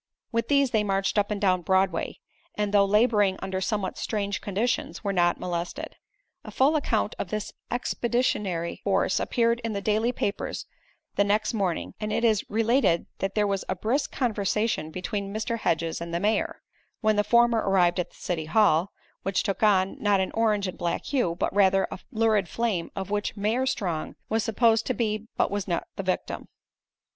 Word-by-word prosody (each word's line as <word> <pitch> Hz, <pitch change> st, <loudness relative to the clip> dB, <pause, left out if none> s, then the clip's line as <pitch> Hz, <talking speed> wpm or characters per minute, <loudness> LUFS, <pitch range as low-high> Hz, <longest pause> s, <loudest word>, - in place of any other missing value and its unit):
With 230 Hz, -1 st, 0 dB
these 280 Hz, -3 st, +3 dB
they 220 Hz, -2 st, +2 dB
marched 195 Hz, +1 st, +1 dB
up 205 Hz, -, 0 dB
and 210 Hz, -1 st, -2 dB
down 185 Hz, -3 st, +2 dB
Broadway 190 Hz, -1 st, +1 dB, 0.4 s
and, 210 Hz, -1 st, -1 dB
though 200 Hz, -1 st, +6 dB
laboring 210 Hz, -2 st, +3 dB
under 190 Hz, 0 st, -3 dB
somewhat 195 Hz, 0 st, -2 dB
strange 200 Hz, -2 st, -2 dB
conditions, 215 Hz, +5 st, -2 dB
were 200 Hz, -1 st, -1 dB
not 175 Hz, -1 st, +2 dB
molested. 175 Hz, -1 st, -4 dB, 0.5 s
A -, -, -9 dB
full 280 Hz, +4 st, +3 dB
account 225 Hz, -7 st, 0 dB
of 180 Hz, -, -3 dB
this 215 Hz, -1 st, -4 dB, 0.2 s
expeditionary 235 Hz, -8 st, -1 dB
force -, -, +2 dB
appeared 235 Hz, -1 st, +1 dB
in 230 Hz, -1 st, -2 dB
the 200 Hz, -, -1 dB
daily 215 Hz, +4 st, +1 dB
papers 205 Hz, -4 st, -3 dB, 0.5 s
the 200 Hz, -, +5 dB
next 210 Hz, +2 st, +1 dB
morning 190 Hz, -6 st, -1 dB
and 215 Hz, 0 st, -3 dB
it 230 Hz, -, 0 dB
is 220 Hz, -4 st, +3 dB
related 225 Hz, -5 st, +2 dB
that 195 Hz, 0 st, -2 dB
there 210 Hz, -1 st, +3 dB
was 195 Hz, -1 st, -1 dB
a 185 Hz, -, 0 dB
brisk 235 Hz, +10 st, -1 dB
conversation 215 Hz, -, 0 dB
between 195 Hz, +3 st, -4 dB
Mr. 220 Hz, +2 st, -2 dB
Hedges 165 Hz, -4 st, -1 dB
and 170 Hz, 0 st, -5 dB
the 170 Hz, -, -1 dB
mayor, 210 Hz, +4 st, 0 dB, 0.4 s
when 215 Hz, -1 st, +3 dB
the 210 Hz, -, +3 dB
former 235 Hz, +1 st, +4 dB
arrived 185 Hz, -3 st, +2 dB
at 180 Hz, -, -1 dB
the -, -, -23 dB
City 165 Hz, -3 st, -3 dB
Hall, 180 Hz, 0 st, +3 dB, 0.3 s
which 195 Hz, -1 st, 0 dB
took 195 Hz, -, -2 dB
on, 195 Hz, -3 st, +3 dB
not 205 Hz, -2 st, +3 dB
an 190 Hz, -, -1 dB
orange 215 Hz, -3 st, +1 dB
and 185 Hz, -, -7 dB
black 170 Hz, -, -2 dB
hue, 245 Hz, -12 st, 0 dB
but 180 Hz, -, -1 dB
rather 195 Hz, -1 st, +4 dB
a -, -, -6 dB
lurid 220 Hz, -5 st, +2 dB
flame, 220 Hz, -8 st, -1 dB
of 195 Hz, 0 st, -5 dB
which 210 Hz, +1 st, -2 dB
Mayor 225 Hz, +6 st, +1 dB
Strong 175 Hz, -11 st, -2 dB
was 225 Hz, 0 st, +1 dB
supposed 225 Hz, 0 st, +2 dB
to 255 Hz, -, 0 dB
be 215 Hz, -1 st, -1 dB
but -, -, +2 dB
was 205 Hz, -1 st, -2 dB
not 170 Hz, -2 st, -1 dB
the -, -, -3 dB
victim. 185 Hz, -1 st, -3 dB
205 Hz, 185 wpm, -26 LUFS, 190-225 Hz, 0.5 s, though